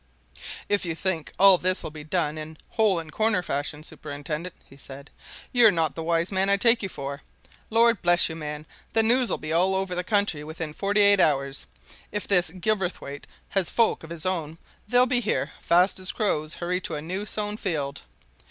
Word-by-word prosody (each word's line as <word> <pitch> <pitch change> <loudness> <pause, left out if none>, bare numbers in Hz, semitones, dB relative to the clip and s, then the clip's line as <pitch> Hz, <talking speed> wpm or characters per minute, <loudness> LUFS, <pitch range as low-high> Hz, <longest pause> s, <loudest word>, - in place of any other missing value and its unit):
"If 205 -1 +1
you 170 -2 -3
think 170 -2 -3
all 195 -2 +7
this'll 185 -3 0
be 150 -1 -9
done 155 -1 -1
in 155 0 -8
hole 215 -5 +2
and 160 -2 -5
corner 215 0 +1
fashion, 145 0 -4
superintendent," 150 +3 -6
he - - -16
said, 140 +1 -11 0.4
"you're 240 -3 +6
not 165 -5 0
the 165 - -5
wise 165 +2 0
man 190 0 +1
I 200 - +4
take 230 +3 +3
you 195 - -3
for. 140 -3 -6 0.5
Lord 230 -1 +3
bless 175 0 +4
you, 160 - -6
man, 150 -1 -6 0.3
the 225 - +3
news'll 245 +2 +2
be 155 +1 -3
all 185 +3 +2
over 190 -1 -2
the 180 0 -2
country 200 -7 0
within 160 0 -6
forty 200 +4 +1
eight 200 -1 +6
hours! 140 -4 +1 0.4
If 205 0 -3
this 180 -4 +3
Gilverthwaite 180 -6 -3 0.2
has 190 -4 +1
folk 230 -6 +1
of 160 - -10
his 170 0 -6
own, 165 -4 -2 0.3
they'll 245 +3 +5
be 250 -1 +2
here 215 -3 -1
fast 180 +3 +3
as 185 0 +1
crows 155 -7 -1
hurry 180 +1 -2
to 165 - -5
a 150 - -4
new 190 +5 -4
sown 210 +1 -2
field! 145 -9 -3
180 Hz, 190 wpm, -25 LUFS, 155-200 Hz, 0.5 s, all